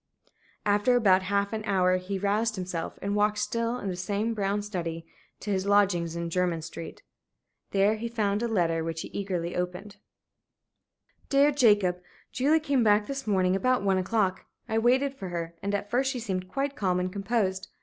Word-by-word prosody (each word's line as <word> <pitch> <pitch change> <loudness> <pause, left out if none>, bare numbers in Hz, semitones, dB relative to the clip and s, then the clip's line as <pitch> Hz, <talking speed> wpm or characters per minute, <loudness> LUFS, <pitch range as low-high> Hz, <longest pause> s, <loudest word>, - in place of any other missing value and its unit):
After 205 +4 +3
about 195 -6 +5
half 200 +2 0
an 215 -1 -3
hour 185 -2 +3
he 185 +2 -4
roused 210 +3 0
himself, 180 -3 -4
and 200 +1 -1
walked, 210 0 +2
still 230 +3 -1
in 200 - -5
the 185 - -2
same 205 +5 -1
brown 205 -1 -1
study, 170 -5 -4 0.4
to 210 - -3
his 190 0 -1
lodgings 190 -5 +2
in 170 0 -4
Jermyn 175 -2 0
Street. 165 0 -8 0.7
There 200 +2 +3
he 230 +2 -4
found 210 -3 0
a 235 - 0
letter 170 -7 +1
which 165 0 -3
he - - -7
eagerly 180 -4 -3
opened. 180 +3 -4 1.3
"DEAR 280 +1 +5
JACOB, 205 -9 +3 0.3
Julie 290 +5 +3
came 285 -5 +1
back 210 -1 +4
this 275 -1 -5
morning 185 -2 +2
about 255 +2 +1
one 190 -1 +2
o'clock. 190 -1 0 0.2
I 220 - +1
waited 260 +4 +2
for 195 -9 -7
her 170 -1 -4
and 200 +1 -1
at 205 0 -4
first 260 +2 +2
she 265 -2 -3
seemed 185 -5 -3
quite 275 +5 -2
calm 185 -5 0
and 180 0 -2
composed. 195 -2 -1
200 Hz, 180 wpm, -27 LUFS, 185-225 Hz, 1.3 s, about